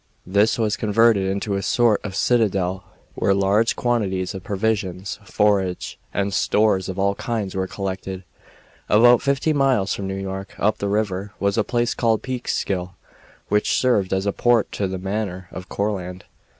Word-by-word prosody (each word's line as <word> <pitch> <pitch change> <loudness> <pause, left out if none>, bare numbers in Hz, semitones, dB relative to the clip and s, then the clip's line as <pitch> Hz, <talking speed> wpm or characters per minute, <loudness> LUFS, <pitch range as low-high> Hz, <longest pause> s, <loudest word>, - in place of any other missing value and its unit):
This 100 +4 +2
was 110 -2 0
converted 105 -2 +3
into 100 +1 -2
a 100 - -1
sort 115 +1 +2
of 95 -3 -5
citadel, 95 -6 +1 0.3
where 100 - +1
large 100 +4 +2
quantities 100 -6 -1
of 95 -2 -7
provisions, 100 -2 -2
forage, 100 -3 0
and 100 0 -1
stores 100 -2 +2
of 95 - -5
all 100 +1 +2
kinds 105 -3 -3
were 95 -1 -2
collected. 95 -1 -5 0.7
About 120 +3 +6
fifty 140 +3 +1
miles 135 -9 +2
from 100 - -4
New 95 - -3
York, 95 0 -6
up 105 +1 +1
the 100 - -1
North 100 - 0 0.2
River, 100 +3 -5
was 100 0 +1
a 110 - +2
place 120 +2 0
called 115 -2 +1
Peekskill, 100 -8 -3 0.5
which 105 0 +2
served 105 -8 +2
as 95 +1 0
a 100 - 0
port 120 -3 +2
to 100 - -2
the 95 0 -4
Manor 95 -1 -4
of 90 0 -8
Courland. 95 -3 -3
100 Hz, 165 wpm, -22 LUFS, 95-110 Hz, 0.7 s, About